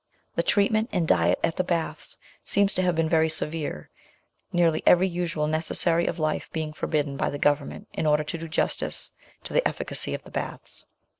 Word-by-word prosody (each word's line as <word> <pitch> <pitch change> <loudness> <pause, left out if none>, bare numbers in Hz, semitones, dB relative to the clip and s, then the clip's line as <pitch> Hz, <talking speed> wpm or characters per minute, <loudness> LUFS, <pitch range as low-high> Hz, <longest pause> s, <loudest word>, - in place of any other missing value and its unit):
The - - +1
treatment 215 +1 +2
and 180 -5 0
diet 85 - +3
at 165 - 0
the 185 - +1
baths 170 -2 -3 0.3
seem 200 0 +2
to 185 - 0
have 180 -2 +1
been 165 0 +1
very 160 0 +2
severe, 155 - 0 0.6
nearly 165 -3 +2
every 180 +2 +5
usual 170 -4 -2
necessary 165 +2 +2
of 170 - -2
life 155 -2 -2
being 155 -1 -4
fordidden 145 -3 -2
by - - 0
the 145 - -4
Government 145 0 -1
in 155 - -2
order 150 0 +3
to 150 - -5
do 165 - -6
justice 160 - -1 0.3
to - - -6
the - - +3
efficacy - - +2
of - - -9
the - - -14
baths. - - -6
160 Hz, 190 wpm, -25 LUFS, 150-175 Hz, 0.6 s, every